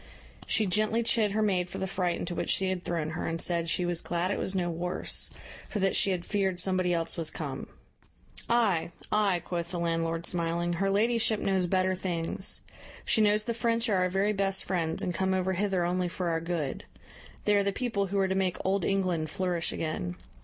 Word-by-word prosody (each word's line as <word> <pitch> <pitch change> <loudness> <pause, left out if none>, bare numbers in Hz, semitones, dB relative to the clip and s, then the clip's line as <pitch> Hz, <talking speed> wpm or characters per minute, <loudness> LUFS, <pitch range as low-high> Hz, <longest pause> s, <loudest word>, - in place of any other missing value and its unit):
She 220 - +2
gently 215 +4 +2
chid 220 -3 +2
her 215 +1 +2
maid 180 -4 +1
for - - -6
the - - -1
fright 180 -2 -1
into 175 - -4
which - - -3
she 190 -1 +2
had 185 -1 -2
thrown 165 -2 -2
her, 160 - -3
and 165 0 -2
said 170 -1 0
"she 175 +3 +1
was 175 -1 +1
glad 175 +2 -1
it - - -1
was 190 - -2
no 180 -2 +1
worse; 175 +2 -1 0.4
for - - -3
that 195 -1 +1
she - - +3
had 180 -2 -1
feared 190 -3 0
somebody 185 -1 +2
else 165 0 0
was 165 -2 +2
come." 140 -4 -5 0.8
"Ay, 220 -10 +2 0.2
ay," 200 -5 +2
quoth 170 -1 -3
the 180 - -3
landlord, 165 0 -1
smiling, 170 0 0
"her 195 +3 0
ladyship 225 +1 +2
knows 190 -2 +1
better 185 +1 +2
things; 180 0 0 0.4
she 220 - +3
knows 210 0 +4
the 235 - -2
French 230 0 +1
are 200 - +3
our 180 0 +2
very 195 +3 +1
best 195 -1 +2
friends, 165 -4 -1
and 180 - -1
come 190 +1 +1
over 185 0 0
hither 190 -2 +1
only 180 +1 0
for 175 0 -2
our 165 -1 0
good. 165 -5 -3 0.6
They 210 - +4
are 200 - +4
the 200 - +1
people 205 -3 -1
who 200 +2 -2
are 195 -1 +3
to 190 - 0
make 190 -2 0
Old 190 0 +1
England 180 -5 0
flourish 175 -1 -1
again. 90 - -3
185 Hz, 210 wpm, -29 LUFS, 170-200 Hz, 0.8 s, knows